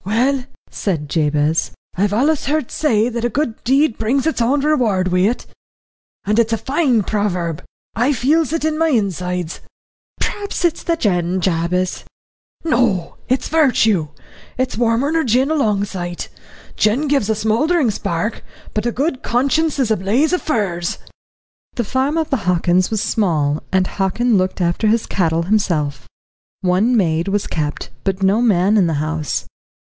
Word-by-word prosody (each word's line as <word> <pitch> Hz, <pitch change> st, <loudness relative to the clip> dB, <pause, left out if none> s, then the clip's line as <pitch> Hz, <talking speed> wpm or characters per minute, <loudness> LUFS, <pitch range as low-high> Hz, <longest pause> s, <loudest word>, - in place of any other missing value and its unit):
"Well," 250 Hz, +6 st, +1 dB, 0.3 s
said 160 Hz, -7 st, -2 dB
Jabez, 150 Hz, 0 st, +1 dB, 0.2 s
"I've 200 Hz, +2 st, +1 dB
allus 280 Hz, +8 st, +1 dB
heard 300 Hz, -3 st, -1 dB
say 225 Hz, -7 st, +2 dB
that 235 Hz, -1 st, -4 dB
a 240 Hz, -, +1 dB
good 250 Hz, -4 st, -2 dB
deed 270 Hz, 0 st, +2 dB
brings 255 Hz, +5 st, +1 dB
its 320 Hz, -6 st, 0 dB
own 270 Hz, +5 st, +2 dB
reward 235 Hz, -11 st, +1 dB
wi' 180 Hz, +3 st, +3 dB
it 245 Hz, -, -4 dB, 0.8 s
and 210 Hz, +3 st, +2 dB
it's 230 Hz, -1 st, +2 dB
a 225 Hz, -, +1 dB
fine 265 Hz, -4 st, +1 dB
proverb. 180 Hz, -6 st, -2 dB, 0.3 s
I 245 Hz, +5 st, +2 dB
feels 300 Hz, +5 st, +2 dB
it 325 Hz, -1 st, -1 dB
in 310 Hz, 0 st, 0 dB
my 325 Hz, -, +3 dB
insides." 180 Hz, -, -1 dB, 0.6 s
"P'raps 405 Hz, -3 st, -2 dB
it's 340 Hz, -, 0 dB
the 335 Hz, -, 0 dB
gin, 185 Hz, -, 0 dB
Jabez." 180 Hz, +1 st, -1 dB, 0.6 s
"No 235 Hz, -, +1 dB
it's 260 Hz, +1 st, +1 dB
virtue. 225 Hz, -, +3 dB, 0.5 s
It's 255 Hz, 0 st, -1 dB
warmer 235 Hz, +5 st, +1 dB
nor 325 Hz, 0 st, +1 dB
gin 255 Hz, +4 st, +2 dB
a -, -, +3 dB
long 215 Hz, -9 st, +1 dB
sight. 175 Hz, -3 st, -5 dB, 0.5 s
Gin 245 Hz, +8 st, +2 dB
gives 275 Hz, -7 st, +1 dB
a 220 Hz, -, +2 dB
smouldering 235 Hz, +6 st, +1 dB
spark, 195 Hz, +2 st, -3 dB, 0.3 s
but 215 Hz, +2 st, -1 dB
a -, -, +1 dB
good 270 Hz, +1 st, -1 dB
conscience 280 Hz, +6 st, +1 dB
is 255 Hz, -5 st, +1 dB
a 220 Hz, -, +3 dB
blaze 235 Hz, -, +1 dB
of 360 Hz, -, +1 dB
furze." 185 Hz, -, -1 dB, 0.8 s
The 240 Hz, -, 0 dB
farm 265 Hz, +7 st, 0 dB
of 320 Hz, -2 st, -1 dB
the 270 Hz, -, +2 dB
Hockins 180 Hz, +1 st, +2 dB
was 215 Hz, -2 st, -1 dB
small, 155 Hz, -8 st, 0 dB
and 190 Hz, -1 st, +2 dB
Hockin 210 Hz, +6 st, 0 dB
looked 185 Hz, 0 st, 0 dB
after 175 Hz, +5 st, +1 dB
his 225 Hz, +1 st, +2 dB
cattle 165 Hz, -3 st, 0 dB
himself. 165 Hz, -8 st, 0 dB, 0.5 s
One 195 Hz, +7 st, +2 dB
maid 165 Hz, -3 st, +1 dB
was 200 Hz, +1 st, 0 dB
kept, 150 Hz, -2 st, -3 dB
but 195 Hz, 0 st, -1 dB
no 200 Hz, +4 st, +3 dB
man 205 Hz, -2 st, +3 dB
in 185 Hz, -4 st, +4 dB
the 165 Hz, -, 0 dB
house. 155 Hz, +1 st, -2 dB
215 Hz, 165 wpm, -19 LUFS, 180-265 Hz, 0.8 s, in